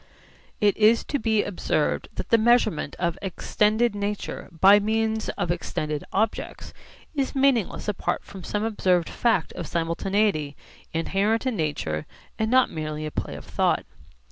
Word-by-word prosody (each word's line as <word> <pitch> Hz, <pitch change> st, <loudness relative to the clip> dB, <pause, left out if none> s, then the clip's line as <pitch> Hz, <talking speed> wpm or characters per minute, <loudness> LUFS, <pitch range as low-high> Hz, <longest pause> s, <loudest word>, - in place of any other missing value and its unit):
It 205 Hz, -1 st, +3 dB
is 220 Hz, +2 st, +5 dB
to 285 Hz, -, -2 dB
be 220 Hz, -2 st, +2 dB
observed 200 Hz, -, -1 dB
that -, -, -5 dB
the 230 Hz, -, +5 dB
measurement 220 Hz, -10 st, +2 dB
of 170 Hz, 0 st, -1 dB
extended 210 Hz, +4 st, +1 dB
nature 205 Hz, 0 st, -4 dB
by 190 Hz, +5 st, +6 dB
means 220 Hz, +1 st, 0 dB
of 175 Hz, -, 0 dB
extended 155 Hz, -3 st, -3 dB
objects 215 Hz, +2 st, -2 dB, 0.4 s
is 280 Hz, -2 st, -1 dB
meaningless 265 Hz, -8 st, +1 dB
apart 210 Hz, -, -1 dB
from 190 Hz, -2 st, -11 dB
some 210 Hz, +4 st, -2 dB
observed 185 Hz, -6 st, +1 dB
fact 225 Hz, -9 st, +1 dB
of -, -, -6 dB
simultaneity 170 Hz, -2 st, 0 dB, 0.4 s
inherent 200 Hz, +8 st, 0 dB
in 255 Hz, -3 st, 0 dB
nature 145 Hz, -, -2 dB, 0.3 s
and 220 Hz, 0 st, +1 dB
not 255 Hz, +1 st, +4 dB
merely 155 Hz, -1 st, -4 dB
a 155 Hz, -, -4 dB
play -, -, -4 dB
of -, -, -9 dB
thought. -, -, +1 dB
205 Hz, 145 wpm, -25 LUFS, 170-220 Hz, 0.4 s, by